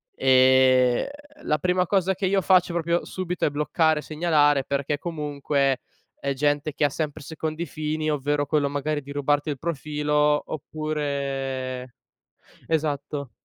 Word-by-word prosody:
Ehm, 130 -1 +4 0.4
la 150 - +1
prima 180 +3 +1
cosa 190 0 +1
che 190 +2 -2
io 195 +1 +2
faccio 180 -1 +3
proprio 170 0 0
subito 180 -2 -3
è - - +3
bloccare, 150 +1 +1
segnalare, 150 -3 +2
perché 140 +2 -1
comunque 145 -4 -1 0.4
è 140 0 -1
gente 145 +2 0
che 150 - -1
ha - - +3
sempre 155 +1 -4
secondi 160 +2 -4
fini, 155 0 -3
ovvero 145 0 0
quello 145 -1 +1
magari 145 +1 -2
di 140 0 -11
rubarti 145 +1 0
il 140 -3 -3
profilo 150 -1 +1
oppure 135 -4 -4 0.7
esatto. 145 -3 -2
150 Hz, 135 wpm, -25 LUFS, 140-155 Hz, 0.7 s, Ehm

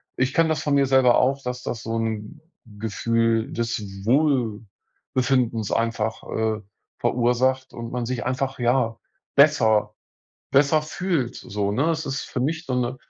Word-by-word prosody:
ich 130 +1 0
kenne 165 +1 +4
das 160 - -1
von 145 -1 +1
mir 140 -1 +4
selber 130 -2 +5
auch, 135 +2 +1
dass 125 0 -4
das 115 - -4
so 115 0 -2
'n 110 -2 -3 0.3
Gefühl 115 +1 0
des 115 -1 -2 0.2
Wohlbefindens 120 -2 0
einfach, 110 -1 -1
äh, 110 -1 -2 0.4
verursacht 130 +2 +1
und 115 0 -7
man 125 -1 -2
sich 125 0 -3
einfach, 130 +1 -2
ja, 120 -2 +1 0.4
besser 110 -8 +4 0.6
besser 145 +3 +4
fühlt 155 -4 -2
so, 100 0 -3
ne? 140 +10 +1
Es 160 -2 -2
ist 135 0 -2
für 125 - -4
mich 160 +6 -1
so 130 - -1
'ne 125 0 -1
125 Hz, 150 wpm, -24 LUFS, 115-135 Hz, 0.6 s, selber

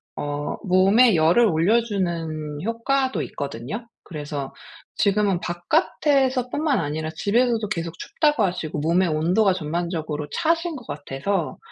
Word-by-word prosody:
어 145 0 -3
몸에 195 +5 +5
열을 165 +9 +4
올려주는 170 -6 0
효과도 260 +4 0
있거든요. 140 - -6 0.2
그래서 145 -4 -6 0.4
지금은 200 -2 +2
바깥에서뿐만 265 - +1
아니라 155 +2 -3
집에서도 225 +3 +1
계속 170 -5 -3
춥다고 295 -7 +1
하시고 175 -5 -2
몸의 170 +5 +2
온도가 180 +6 +2
전반적으로 160 -3 -3
차신 330 0 0
것 245 -5 -9
같아서 150 +5 -3
185 Hz, 300 characters per minute, -23 LUFS, 155-235 Hz, 0.4 s, 몸에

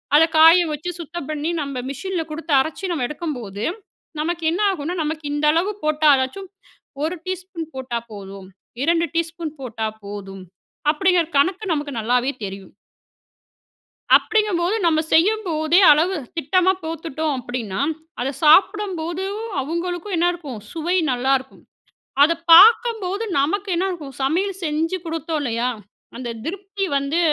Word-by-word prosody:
அத 305 - +7
காய 330 +3 +8
வச்சு 300 +4 -5
சுத்தம் 335 -2 -7
பண்ணி, 305 +2 -2
நம்ம 275 -3 -4
மிஷின்ல 345 +5 -3
குடுத்து 320 0 -3
அரச்சு 335 +6 -4
நம்ம 290 -8 -1
எடுக்கம்போது, 245 - -5 0.6
நமக்கு 335 +1 -2
என்ன 350 - -1
ஆகுன்னா, 345 -1 -4
"நமக்கு 310 0 -4
இந்த 295 +1 0
அளவு 350 +6 +1
போட்டா 305 0 +2
அதாச்சும் 270 +9 -3 0.5
1 325 +4 -1
டீஸ்பூன் 370 -3 -5
போட்டா 250 -3 -3
போதும். 195 -2 -9 0.4
2 335 +2 +2
டீஸ்பூன் 330 -1 -2
போட்டா 225 -3 -3 0.2
போதும்." 195 -2 -8 0.5
அப்பிடிங்கிற 360 +1 +2
கணக்கு 370 +8 +1
நமக்கு 290 -1 -3
நல்லாவே 245 +4 +1
தெரியும். 195 -1 -7 1.5
அப்படிங்கும்போது, 415 -3 +1
நம்ம 315 -2 +3
செய்யும்போதே, 340 -3 +3
அளவு 335 +6 +2 0.2
திட்டமா 365 +4 +2
போட்டுட்டோம் 320 -2 -3
அப்படின்னா, 240 -6 -4 0.4
அத 260 +3 -1
சாப்பிடம்போதும், 380 +3 +2 0.2
அவுங்களுக்கும் 350 +6 -3
என்னாருக்கும்? 335 -7 -1
சுவை 340 +3 -1
நல்லாருக்கும். 260 +1 -1 0.6
அத 305 +3 +6 0.2
பாக்கம்போது 445 +1 +6 0.2
நமக்கு 390 +8 -1
என்னா 365 +3 0
ஆகும்? 305 -6 -8
சமையல் 370 +8 0
செஞ்சு 320 +3 -1
குடுத்தோம் 325 -1 -3
இல்லையா? 240 -1 -1 0.5
அந்த 240 -1 -5
திருப்தி 390 +4 -4
வந்து 280 +4 0
320 Hz, 125 wpm, -21 LUFS, 275-360 Hz, 1.5 s, காய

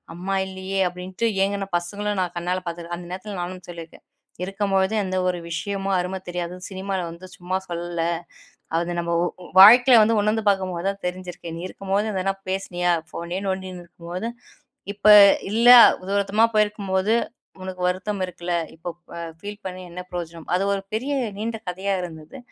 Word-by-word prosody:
அம்மா 190 +3 -2
இல்லயே! 190 +1 -4
அப்பிடின்ட்டு 180 +5 -3 0.2
ஏங்குன 200 0 -1
பசங்களும் 205 +3 -3
நான் 180 -1 -3
கண்ணால 180 +2 -1
பார்த்துக்குறேன். 170 0 -5
அந்த 175 0 -9
நேரத்துல 190 +1 -6
நானும் 180 0 -6
சொல்லியிருக்கேன், 170 -2 -10 0.4
இருக்கும்பொழுது 195 +1 0
எந்த 185 0 -2
ஒரு 180 -1 0
விஷயமும் 195 +3 -2
அரும 180 +2 -2
தெரியாது. 175 0 -4
சினிமால 190 0 -3
வந்து 170 +2 -10
சும்மா 185 +1 -2
சொல்லல. 170 -1 -4 0.8
அது 175 0 -2
நம்ம 170 0 -2
ஒ - - +2 0.4
வாழ்க்கையில 245 +4 +9
வந்து 225 0 +2
உணர்ந்து 215 +1 +1
பார்க்கும்போது 185 -2 -1
தான் 200 -1 -6
தெரிஞ்சிருக்கு. 180 -2 -7
நீ - - -6
இருக்கும்போது 195 +3 -1
எதனா 195 0 0 0.2
பேசுனியா? 180 -2 -1 0.2
ஃபோனையே 170 +3 -5
நோண்டின்னு 190 -2 -4
இருக்கும் 170 0 -12
போது, 205 +6 -3 0.6
இப்ப 210 +1 +1 0.4
இல்ல, 235 +3 +5 0.4
தூரத்தமா 200 +2 +2
போயிருக்கும் 210 -2 0
போது, 190 +4 +2 0.5
உனக்கு 185 -1 -7
வருத்தம் 190 +2 -2
இருக்குல. 175 0 -5 0.2
இப்ப 165 +2 -8 0.3
அ 170 - -5 0.2
பீல் 205 0 -7
பண்ணி 185 0 -6
என்ன 180 - -7
பிரயோஜனம்? 170 -2 -6
அது 185 - +2
ஒரு 195 - -3
பெரிய 260 +6 -2 0.3
நீண்ட 225 +1 -3
கதையா 190 +2 -1
இருந்தது. 160 - -9
185 Hz, 155 wpm, -23 LUFS, 175-200 Hz, 0.8 s, வாழ்க்கையில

